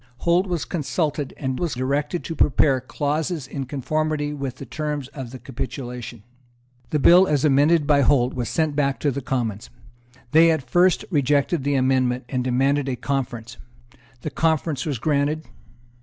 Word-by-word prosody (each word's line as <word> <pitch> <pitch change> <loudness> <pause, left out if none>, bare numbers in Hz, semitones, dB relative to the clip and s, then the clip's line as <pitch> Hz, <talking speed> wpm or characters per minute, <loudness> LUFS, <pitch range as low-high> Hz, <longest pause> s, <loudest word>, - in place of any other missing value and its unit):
Holt 175 +6 +2
was 175 -4 -2
consulted, 150 -3 -2
and 130 -2 -3
was 170 -5 -2
directed 140 +6 -1
to 165 - -5
prepare 135 -2 +3
clauses 150 +3 -2
in 135 0 -5
conformity 150 +2 -1
with 135 -3 -4
the 135 - -9
terms 145 +1 -4
of 135 -3 -7
the 130 - -8
capitulation. 125 -2 -6 0.7
The 150 - 0
bill, 180 +6 +6
as 150 -1 +1
amended 150 +3 +4
by 145 -1 +4
Holt, 130 -2 +3
was 125 -3 -3
sent 155 -3 0
back 140 -2 0
to 145 - +1
the 140 +2 -4
Commons. 120 -4 -3 0.6
They 165 +2 +6
at 155 -6 0
first 180 +6 +3
rejected 145 +1 +1
the 140 0 +1
amendment, 130 -1 +1
and 130 -2 -1
demanded 135 +3 +1
a 130 - -1
conference. 125 -2 -4 0.6
The 155 - -4
conference 160 -1 0
was 145 -4 -1
granted. 150 +4 0
140 Hz, 160 wpm, -23 LUFS, 130-155 Hz, 0.7 s, bill